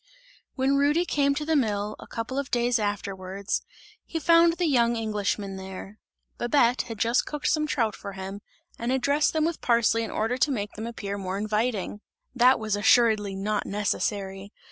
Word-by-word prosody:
When 270 +1 +2
Rudy 295 +5 +3
came 280 -4 +1
to 300 +1 -3
the 320 0 +1
mill, 210 -6 0
a - - -11
couple 235 +4 -4
of 280 0 -4
days 240 0 +1
afterwards, 200 -1 -3 0.4
he 330 - -5
found 335 +2 +5
the 350 +1 -1
young 240 -6 +3
Englishman 205 -3 -2
there. 190 +2 -9 0.4
Babette 240 -1 +3
had 225 -2 -6
just 230 +4 +1
cooked 295 -1 -2
some 305 -1 +1
trout 225 -8 0
for 200 - -8
him 195 +1 -7 0.4
and 235 +2 -1
had 265 0 +1
dressed 285 +3 +2
them 315 -1 +1
with 335 0 -2
parsley 230 -1 +3
in 225 - -3
order 225 +3 -1
to 300 - +3
make 205 -5 -2
them 220 +1 -6
appear 200 -3 -5
more 190 0 -3
inviting. 210 -1 -1 0.3
That 250 +1 +5
was 215 -2 -1
assuredly 215 -2 +3
not 205 +2 -2
necessary. 200 -1 -2
225 Hz, 180 wpm, -26 LUFS, 205-265 Hz, 0.4 s, found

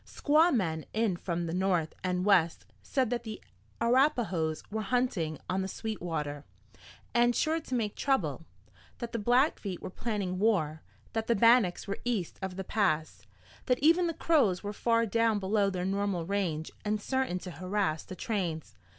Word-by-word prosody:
Squaw 315 +4 +3
men 165 - 0
in 215 -4 +1
from 170 -1 -3
the 165 - -3
north 180 -4 +1
and 180 0 0
west 175 -5 +3 0.2
said 260 -4 0
that 245 - 0
the 220 -2 -7 0.4
Arapahoes 230 - +2
were 220 +1 -2
hunting 205 - 0
on 185 +1 0
the 190 - -2
Sweetwater, 165 -9 -4 0.7
and 240 -1 +4
sure 320 +1 +1
to 265 -5 -4
make 215 -4 -1
trouble; 165 - 0 0.5
that 235 -1 -5
the 230 - -2
Blackfeet 240 - +1
were - - -7
planning 200 -4 -3
war; 160 -8 +1 0.3
that 225 0 -2
the 235 - +3
Bannacks 230 -4 +4
were 200 - -3
east 225 -8 -2
of 190 -1 -4
the 190 - -4
Pass; 180 -7 -1 0.4
that 250 -1 +3
even 335 +5 +4
the 330 - -2
Crows 250 - +2
were 205 0 -4
far 230 +2 +2
down 230 0 +2
below 200 +1 +1
their 180 -2 -3
normal 195 -3 -1
range 175 -5 -2
and 210 0 0
certain 260 -4 -1
to 180 0 -7
harass 180 -1 -1
the 185 - -9
trains. 180 -8 -3
200 Hz, 170 wpm, -30 LUFS, 180-235 Hz, 0.7 s, and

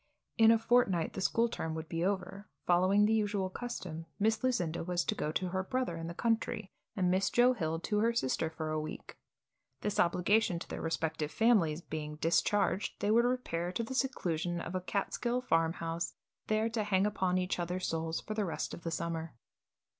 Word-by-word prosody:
In 225 -1 +6
a 230 - +7
fortnight 225 -7 +2
the - - -4
school 230 +5 +2
term 160 -8 -4
would 160 0 -5
be 165 +1 -2
over. 200 +1 -2 0.2
Following 185 +4 +4
the 220 - +3
usual 205 -3 0
custom, 180 -9 -6
Miss 220 +4 +1
Lucinda 175 -12 0
was 175 0 -1
to - - +1
go 155 - -2
to 185 +1 -1
her 190 +1 -1
brother 255 -2 -2
in 165 0 -5
the 170 - -6
country 225 -2 -1 0.2
and 180 -3 +2
Miss 190 +1 +2
Joe 245 +1 +5
Hill 165 -8 -2
to 210 +3 0
her 230 +2 +3
sister 160 - 0
for 160 -1 -4
a 155 - 0
week. 155 - -7 0.7
This 210 -1 -1
obligation 180 +2 +3
to - - -7
their - - -5
respective 160 -2 -1
families 175 -8 +3
being 150 -2 -5
discharged, 180 +6 +1
they 205 - +1
would 235 +2 +5
repair 180 -9 -1
to 230 - -2
the 230 - -5
seclusion 175 - -1
of 170 - -5
a 185 - -1
Catskill 235 +6 -1
farmhouse, 165 -5 0 0.3
there 215 +1 +2
to 225 -1 -1
hang 195 -1 +2
upon 190 -3 +1
each 180 0 -1
other's 180 +1 -2
souls 165 0 -2
for 215 - -5
the 215 -1 0
rest 175 - -3
of - - -7
the 165 - -3
summer. 165 -2 -3
185 Hz, 195 wpm, -32 LUFS, 165-220 Hz, 0.7 s, a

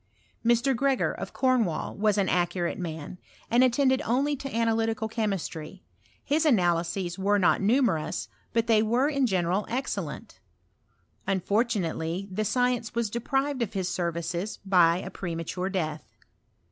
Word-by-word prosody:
Mr. 240 +3 +3
Gregor, 270 +2 +1
of - - -6
Cornwall, 245 - +1
was 210 0 +2
an 195 -2 +2
accurate 175 0 0
man, 165 0 -6 0.3
and 240 +2 +5
attended 260 +1 +3
only 275 +5 +1
to 275 0 -6
analytical 225 -1 0
chemistry: 195 -6 -4 0.4
his 300 +3 +1
analyses 175 - +1
were 205 +2 +2
not 185 -1 +3
numerous, 215 - +1 0.2
but 230 -1 +1
they 225 -2 +4
were 240 +5 +2
in 275 -3 +1
general 185 0 0
excel 255 +4 -2
lent. - - -9 0.9
Unfortunately 195 -3 0
the 210 +3 -1
science 245 0 0
was 230 -3 0
deprived 270 +3 -1
of 225 -2 -2
his 190 -3 -1
services 170 +2 -2
by 175 -3 +5
a 190 +1 -6
premature 175 +1 -4
death. 155 -5 -2
205 Hz, 135 wpm, -27 LUFS, 175-240 Hz, 0.9 s, and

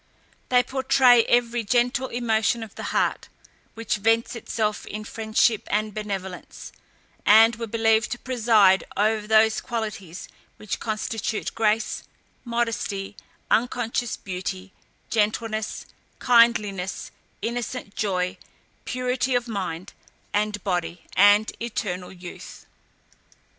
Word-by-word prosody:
They 250 -1 +4
portray 260 -2 +4
every 240 -1 +2
gentle 245 +4 +1
emotion 230 -1 0
of 220 - -10
the - - -7
heart, - - 0 0.5
which 230 -2 -1
vents 225 +3 +1
itself 215 -2 -2
in 215 +1 -6
friendship 220 0 +1
and 215 0 -1
benevolence, 195 -3 -6 0.5
and 225 +2 +7
were 230 0 -4
believed 225 0 +2
to - - -6
preside 220 -7 +3
over 215 0 +1
those 220 0 +4
qualities 210 -7 -5 0.3
which 215 - -4
constitute 220 0 -3
grace, 215 0 0 0.4
modesty, 230 -4 -2 0.4
unconscious 240 0 0
beauty, 185 0 -6 0.4
gentleness, 215 0 -1 0.3
kindliness, 215 -6 +2 0.3
innocent 235 -1 -4
joy, 180 -3 -1 0.5
purity 250 +1 -1
of 245 0 0
mind 185 -5 -4 0.4
and 205 -1 -1
body, 175 -3 -2
and 205 +2 +5
eternal 195 -6 -4
youth. 180 -1 -11
220 Hz, 105 wpm, -24 LUFS, 205-235 Hz, 0.5 s, and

